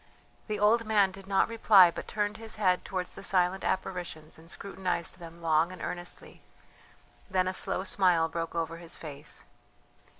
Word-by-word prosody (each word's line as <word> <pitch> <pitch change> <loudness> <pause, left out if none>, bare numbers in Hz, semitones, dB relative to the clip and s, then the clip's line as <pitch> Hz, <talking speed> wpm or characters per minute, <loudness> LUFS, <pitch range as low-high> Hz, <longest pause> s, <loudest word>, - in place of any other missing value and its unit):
The 215 -1 -2
old 220 +3 +4
man 210 -3 +3
did 195 0 -12
not 195 -1 +3
reply, 205 -6 +6
but - - -7
turned 210 0 -2
his 225 -1 -3
head 185 -4 +2
towards 185 -2 -4
the - - -10
silent 185 0 +2
apparitions 175 -5 -3
and 165 +1 -14
scrutinized 185 -2 -3
them 170 0 -11
long 160 +1 +3
and 185 - -10
earnestly, 175 0 -6 0.9
then 185 -1 +1
a 185 - -1
slow 185 - 0
smile 180 -4 +3
broke 165 0 -4
over 165 0 -2
his 170 0 -6
face. 150 -1 -6
185 Hz, 165 wpm, -29 LUFS, 170-195 Hz, 0.9 s, reply